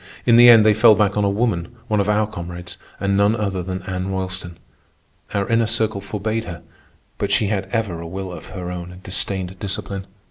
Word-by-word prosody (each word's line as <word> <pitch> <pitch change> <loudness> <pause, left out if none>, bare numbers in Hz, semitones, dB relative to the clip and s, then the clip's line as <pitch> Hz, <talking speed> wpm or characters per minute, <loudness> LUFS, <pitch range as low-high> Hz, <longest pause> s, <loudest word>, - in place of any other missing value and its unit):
In 115 - +5
the 120 +1 +9
end 115 -2 +8
they 110 - +6
fell 110 +1 +6
back 100 -1 +1
on 105 - +1
a 100 - +2
woman, 100 -2 -1
one 105 -1 +1
of 100 0 +1
our 105 +1 +3
comrades, 90 -3 -7 0.2
and 100 0 0
none 100 +2 +3
other 100 -4 -2
than 95 0 -5
Anna 95 0 -4
Roylston. 95 -2 -4 0.7
Our 100 -1 -1
Inner 115 -1 +2
Circle 110 -2 0
forbade 110 +3 -3
her, 85 -1 -8 0.6
but - - -1
she 105 - +2
had 100 -2 -1
ever 95 -5 -2
a 85 - -7
will 95 +2 -5
of - - -9
her 90 -2 -6
own 90 0 -6
and 90 +1 -13
disdained 95 0 -2
discipline. 100 -1 -4
100 Hz, 210 wpm, -21 LUFS, 90-110 Hz, 0.7 s, the